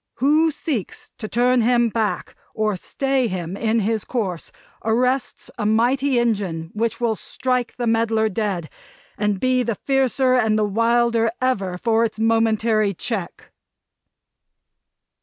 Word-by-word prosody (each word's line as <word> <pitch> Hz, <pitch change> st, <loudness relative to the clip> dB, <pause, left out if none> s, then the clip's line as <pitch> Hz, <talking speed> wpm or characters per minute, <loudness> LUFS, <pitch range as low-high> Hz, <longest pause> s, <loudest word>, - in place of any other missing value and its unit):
Who 305 Hz, +5 st, +3 dB
seeks 290 Hz, -, -4 dB
to 215 Hz, -, -4 dB
turn 245 Hz, +2 st, +2 dB
him 240 Hz, 0 st, +3 dB
back, 220 Hz, -1 st, -2 dB, 0.2 s
or 215 Hz, -2 st, 0 dB
stay 270 Hz, +6 st, -1 dB
him 180 Hz, -2 st, -4 dB
on 220 Hz, +2 st, 0 dB
his 215 Hz, 0 st, -1 dB
course, 195 Hz, -9 st, -3 dB, 0.3 s
arrests 250 Hz, +4 st, 0 dB
a 210 Hz, -, -1 dB
mighty 250 Hz, +5 st, +2 dB
engine 195 Hz, -9 st, -1 dB
which 230 Hz, +1 st, -1 dB
will 235 Hz, -2 st, +1 dB
strike 250 Hz, +2 st, -2 dB
the 245 Hz, -, -3 dB
meddler 225 Hz, -1 st, +2 dB
dead; 200 Hz, -6 st, -2 dB, 0.5 s
and 210 Hz, -2 st, -1 dB
be 255 Hz, +1 st, +2 dB
the 235 Hz, -2 st, -1 dB
fiercer 265 Hz, +1 st, +1 dB
and 220 Hz, -4 st, +2 dB
the 215 Hz, -, +2 dB
wilder, 230 Hz, +2 st, +2 dB
ever, 200 Hz, -8 st, -1 dB
for 225 Hz, +3 st, +2 dB
its 220 Hz, -2 st, -2 dB
momentary 220 Hz, -2 st, +2 dB
check!" 195 Hz, -2 st, -5 dB
225 Hz, 135 wpm, -21 LUFS, 215-250 Hz, 0.5 s, Who